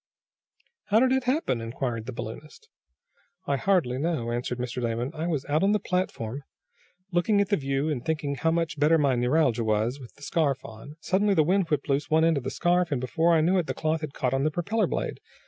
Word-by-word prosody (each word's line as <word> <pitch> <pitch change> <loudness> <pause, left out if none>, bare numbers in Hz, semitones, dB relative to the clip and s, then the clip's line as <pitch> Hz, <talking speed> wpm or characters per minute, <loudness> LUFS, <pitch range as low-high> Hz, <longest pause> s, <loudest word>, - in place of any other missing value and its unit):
"How 210 +2 +3
did 255 +1 +3
it 265 -1 +1
happen?" 255 - 0
inquired 115 -1 -4
the - - -3
balloonist. 120 +6 -9 0.8
"I 140 - +1
hardly 140 -7 +1
know," 145 -7 -1
answered 120 +1 -2
Mr. 125 0 -4
Damon. 120 +3 -2
"I 160 +1 -3
was 150 -6 -1
out 150 +2 +1
on 200 +2 +3
the 210 - +2
platform, 145 - -2 0.7
looking 185 +4 +2
at 200 -1 +1
the 205 - +3
view, 135 -1 -1
and 145 -6 -2
thinking 155 -3 -1
how 140 +4 0
much 165 -2 -1
better 155 +3 +5
my 140 -3 +2
neuralgia 125 -1 +2
was, 110 +5 0
with 125 -3 -12
the 145 - -16
scarf 140 -4 0
on. 115 +7 -10
Suddenly 200 +1 +2
the 155 - +5
wind 185 +2 +1
whipped 150 -2 -1
loose 140 0 0
one 160 +1 +4
end 165 -2 +3
of - - -11
the 130 - -2
scarf, 175 +2 +1
and, 140 - 0
before 165 +7 +2
I 160 - +4
knew 180 +4 +3
it 170 - -2
the - - -3
cloth 155 0 -1
had 155 -3 -6
caught 125 -1 -1
on 135 0 +1
the 155 - +2
propeller 200 +8 0
blade. - - -3
150 Hz, 225 wpm, -26 LUFS, 125-170 Hz, 0.8 s, better